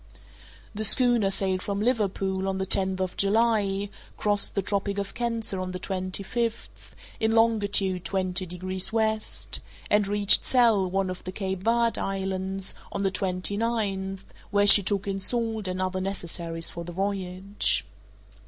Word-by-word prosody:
The 215 +1 -4
schooner 240 -2 +5
sailed 190 -1 0
from 200 +1 -3
Liverpool 195 -4 -1
on 190 0 -1
the 190 - -2
tenth 190 0 +1
of 185 -1 -3
July, 205 -1 +1 0.3
crossed 205 -1 +3
the 200 - 0
Tropic 200 0 -2
of 200 -1 -4
Cancer 230 -4 -3
on 185 0 -4
the - - -3
twenty 185 +1 -3
fifth, 230 +2 -5 0.2
in 220 0 +1
longitude 205 -5 +3
twenty 185 -1 -1
degrees 185 +2 0
west, 220 -1 -1 0.3
and 210 -1 +3
reached 205 0 +4
Sal, 225 -7 +3
one 190 0 -1
of 185 - -8
the 185 - -6
Cape 190 -1 -4
Verd 230 +1 +1
islands, 190 0 -3 0.2
on 200 - -3
the 195 - +1
twenty 185 +1 -1
ninth, 195 -4 -2 0.2
where 205 -1 +2
she 205 0 +9
took 200 0 -2
in 195 -1 -2
salt 225 -1 -1
and 185 0 -3
other 185 0 -2
necessaries 170 -3 -3
for 170 - -4
the 175 +1 -8
voyage. 195 - 0
195 Hz, 155 wpm, -26 LUFS, 185-215 Hz, 0.3 s, she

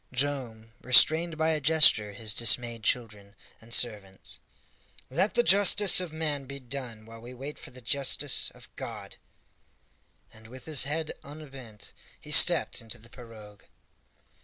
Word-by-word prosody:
Joam 125 -5 -4
restrained 160 +6 +4
by 160 +1 0
a 155 -1 -1
gesture 135 -9 +3
his 110 0 -3
dismayed 115 +1 +1
children 110 -3 -4 0.3
and 115 +1 -18
servants. 105 -6 -4 0.7
"Let 190 +10 -1
the 240 - +3
justice 200 -1 +5
of 180 -3 -6
man 150 -3 -4
be 140 +1 -9
done 125 -4 -7
while 115 0 -13
we 120 +2 -11
wait 140 +4 -9
for - - -12
the 125 0 -15
justice 140 +2 0
of - - -16
God!" - - -9 1.2
And 110 0 -16
with 130 +3 -13
his 150 -5 +3
head 155 +2 -4
unbent, 135 -7 -12 0.3
he - - -11
stepped - - +5
into 115 +1 -7
the 115 0 -17
pirogue. 110 -5 -14
125 Hz, 145 wpm, -27 LUFS, 115-150 Hz, 1.2 s, justice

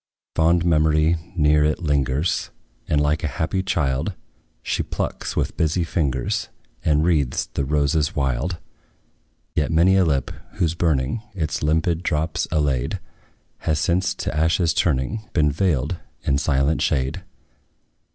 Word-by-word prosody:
Fond 85 +1 +3
memory 80 0 +3 0.2
near 75 -2 +4
it 75 0 +2
lingers, 75 -1 0 0.4
And, 75 - +2
like 75 +2 +1
a - - +1
happy 80 +6 -1
child, 80 -2 0 0.5
She - - -1
plucks, - - -4
with - - -1
busy 80 +2 +1
fingers, 70 -7 -1 0.3
And 75 -1 +3
wreathes 75 -7 +1
the 70 - -1
roses 75 +1 +1
wild. 70 +5 -1 1.0
Yet 75 - 0
many 85 +4 +4
a 95 - +5
lip, 70 -6 0 0.2
whose 80 -2 0
burning 80 - 0
Its 80 -5 -2
limpid 80 +2 +1
drops 80 0 -1
allayed, 70 -6 0 0.6
Has 80 -2 0
since, 85 +4 +1
to - - -3
ashes 80 +2 +2
turning, 90 - 0
Been 75 -3 +3
veiled 80 0 0 0.3
in 70 0 +1
silent 70 +1 +1
shade. 65 0 0
75 Hz, 130 wpm, -22 LUFS, 70-85 Hz, 1.0 s, a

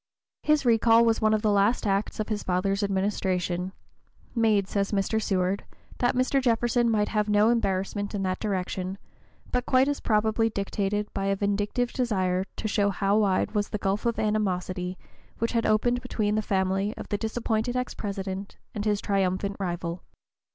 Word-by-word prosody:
His 300 -3 +2
recall 230 0 +5
was 225 -1 +2
one 215 0 +3
of 215 0 +1
the 215 - +3
(p. - - +3
025) 200 0 +5
last 235 +1 -1
acts 200 +1 0
of 215 - -2
his 215 -2 -1
father's 195 +2 0
administration, 190 -2 -1 0.6
made, 215 -4 +2
says 200 -1 -1
Mr. 205 +2 0
Seward, 190 -1 0 0.4
"that 245 0 +2
Mr. 255 +2 +2
Jefferson 240 -1 +2
might 210 -2 +1
have 210 -1 0
no 210 +2 +4
embarrassment 205 -2 -1
in 195 - -2
that 185 -1 -1
direction," 190 -2 -2 0.5
but 250 0 -1
quite 260 +1 +4
as 290 0 -1
probably 220 +1 +2
dictated 205 0 -2
by 195 - -2
a 195 0 +2
vindictive 205 +5 -1
desire 190 -7 0
to - - -3
show 205 -1 +2
how 195 +1 +1
wide 200 0 +1
was 210 -1 -1
the - - -2
gulf 200 +3 -1
of 235 - 0
animosity 185 -3 -1 0.4
which 230 - -1
had 230 -1 +1
opened 240 +3 +2
between 210 -2 -1
the 215 - +1
family 195 +1 0
of - - -8
the 205 - 0
disappointed 225 +1 -1
ex 250 0 -2
President 195 -1 -5 0.2
and 205 0 -4
his 210 -1 +1
triumphant 195 0 0
rival. 175 -2 -3
205 Hz, 180 wpm, -27 LUFS, 195-225 Hz, 0.6 s, recall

